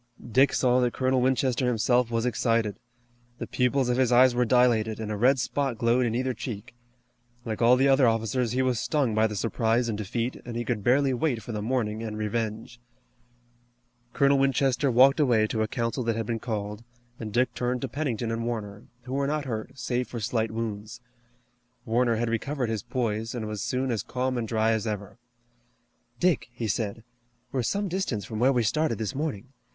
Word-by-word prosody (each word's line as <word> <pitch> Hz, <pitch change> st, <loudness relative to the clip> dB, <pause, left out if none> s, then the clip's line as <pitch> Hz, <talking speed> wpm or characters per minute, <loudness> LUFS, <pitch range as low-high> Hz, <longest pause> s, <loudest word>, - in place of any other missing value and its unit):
Dick 135 Hz, +4 st, +5 dB
saw 125 Hz, -1 st, +3 dB
that 125 Hz, -1 st, +1 dB
Colonel 130 Hz, -1 st, +1 dB
Winchester 130 Hz, -1 st, +1 dB
himself 120 Hz, +1 st, +2 dB
was 115 Hz, 0 st, -1 dB
excited. 115 Hz, -3 st, 0 dB, 0.6 s
The -, -, -5 dB
pupils 125 Hz, +1 st, +1 dB
of 125 Hz, 0 st, +1 dB
his 130 Hz, -2 st, +2 dB
eyes 125 Hz, +1 st, +6 dB
were 125 Hz, 0 st, +2 dB
dilated, 115 Hz, -3 st, +2 dB
and 110 Hz, -1 st, -4 dB
a -, -, -1 dB
red 125 Hz, +6 st, +4 dB
spot 135 Hz, 0 st, -1 dB
glowed 120 Hz, +2 st, +2 dB
in 115 Hz, -, -2 dB
either 130 Hz, +1 st, 0 dB
cheek. 110 Hz, -2 st, -7 dB, 0.7 s
Like 110 Hz, -1 st, -4 dB
all 120 Hz, +2 st, +6 dB
the 135 Hz, +2 st, +3 dB
other 135 Hz, -2 st, +5 dB
officers 115 Hz, +1 st, 0 dB
he 130 Hz, +1 st, +1 dB
was 125 Hz, -3 st, +1 dB
stung 140 Hz, -8 st, 0 dB
by 110 Hz, +1 st, +3 dB
the 105 Hz, -, -6 dB
surprise 115 Hz, +2 st, 0 dB
and 110 Hz, -, -1 dB
defeat, 115 Hz, +4 st, -3 dB
and 120 Hz, -1 st, -7 dB
he 120 Hz, -, -3 dB
could 110 Hz, -3 st, -2 dB
barely 135 Hz, +3 st, +3 dB
wait 125 Hz, -3 st, -1 dB
for 120 Hz, -, -7 dB
the 105 Hz, -2 st, -3 dB
morning 110 Hz, -2 st, -1 dB
and 110 Hz, -2 st, -5 dB
revenge. 110 Hz, +2 st, -3 dB, 1.3 s
Colonel 140 Hz, +2 st, +3 dB
Winchester 135 Hz, 0 st, +2 dB
walked 130 Hz, +4 st, +5 dB
away 120 Hz, -7 st, +4 dB
to 110 Hz, 0 st, -2 dB
a 110 Hz, -, +1 dB
council 115 Hz, +3 st, -2 dB
that 115 Hz, -1 st, 0 dB
had 115 Hz, 0 st, -2 dB
been 115 Hz, +1 st, -2 dB
called, 105 Hz, -1 st, -4 dB, 0.4 s
and 110 Hz, -2 st, -5 dB
Dick 125 Hz, +4 st, +1 dB
turned 125 Hz, 0 st, -2 dB
to 135 Hz, -, -2 dB
Pennington 125 Hz, -5 st, -2 dB
and 115 Hz, 0 st, -2 dB
Warner, 110 Hz, -3 st, -5 dB, 0.2 s
who 130 Hz, -, -7 dB
were 140 Hz, 0 st, 0 dB
not 150 Hz, 0 st, -1 dB
hurt, 110 Hz, 0 st, -5 dB
save 125 Hz, -1 st, -2 dB
for 120 Hz, -, -6 dB
slight 110 Hz, 0 st, -1 dB
wounds. 110 Hz, 0 st, -5 dB, 0.9 s
Warner 120 Hz, +1 st, +2 dB
had 120 Hz, +2 st, -1 dB
recovered 125 Hz, +2 st, -2 dB
his 110 Hz, -3 st, -2 dB
poise, 115 Hz, -2 st, -2 dB
and 115 Hz, -3 st, -3 dB
was 105 Hz, -2 st, -4 dB
soon 130 Hz, +4 st, -1 dB
as 110 Hz, -4 st, -1 dB
calm 130 Hz, +3 st, -2 dB
and 120 Hz, -2 st, -2 dB
dry 110 Hz, 0 st, +1 dB
as 110 Hz, 0 st, -1 dB
ever. 105 Hz, +1 st, -5 dB, 1.0 s
"Dick," 180 Hz, -5 st, +2 dB
he 120 Hz, -2 st, -4 dB
said, 110 Hz, +2 st, -2 dB, 0.5 s
"we're 130 Hz, -, 0 dB
some 200 Hz, -, -1 dB
distance 170 Hz, -, -2 dB
from 110 Hz, -, -5 dB
where 130 Hz, +3 st, +4 dB
we 125 Hz, -3 st, +2 dB
started 150 Hz, +1 st, 0 dB
this 110 Hz, -2 st, -3 dB
morning. 135 Hz, -5 st, -4 dB
120 Hz, 200 wpm, -27 LUFS, 110-130 Hz, 1.3 s, eyes